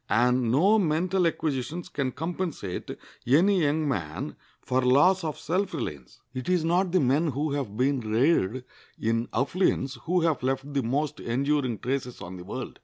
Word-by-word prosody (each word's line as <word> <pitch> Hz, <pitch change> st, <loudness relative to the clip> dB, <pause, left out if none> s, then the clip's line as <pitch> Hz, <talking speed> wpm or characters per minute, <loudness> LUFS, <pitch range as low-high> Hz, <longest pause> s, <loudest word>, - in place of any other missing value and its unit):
And 125 Hz, 0 st, +3 dB
no 195 Hz, -, +4 dB
mental 180 Hz, +1 st, +1 dB
acquisitions 155 Hz, +1 st, -2 dB
can 140 Hz, -7 st, -2 dB
compensate 165 Hz, -, -4 dB, 0.4 s
any 180 Hz, +9 st, +4 dB
young 155 Hz, +1 st, +1 dB
man 80 Hz, -, -3 dB, 0.2 s
for 130 Hz, +1 st, 0 dB
loss 145 Hz, +9 st, +4 dB
of 155 Hz, -2 st, -3 dB
self 185 Hz, +2 st, -1 dB
reliance. 75 Hz, -, -6 dB
It 130 Hz, +5 st, -5 dB
is 180 Hz, -3 st, +2 dB
not 175 Hz, +2 st, +2 dB
the 185 Hz, -, +3 dB
men 145 Hz, +4 st, +2 dB
who 145 Hz, +2 st, -1 dB
have 135 Hz, -8 st, -3 dB
been 135 Hz, +2 st, +2 dB
reared 120 Hz, -, +1 dB, 0.3 s
in 115 Hz, +1 st, 0 dB
affluence 135 Hz, -, 0 dB
who 180 Hz, +1 st, +2 dB
have 160 Hz, -4 st, +1 dB
left 135 Hz, +2 st, -2 dB
the 140 Hz, -, +1 dB
most 135 Hz, +5 st, -1 dB
enduring 130 Hz, -1 st, 0 dB
traces 125 Hz, 0 st, -3 dB
on 90 Hz, +1 st, -8 dB
the 90 Hz, -, -9 dB
world. -, -, -6 dB
140 Hz, 165 wpm, -27 LUFS, 125-165 Hz, 0.4 s, no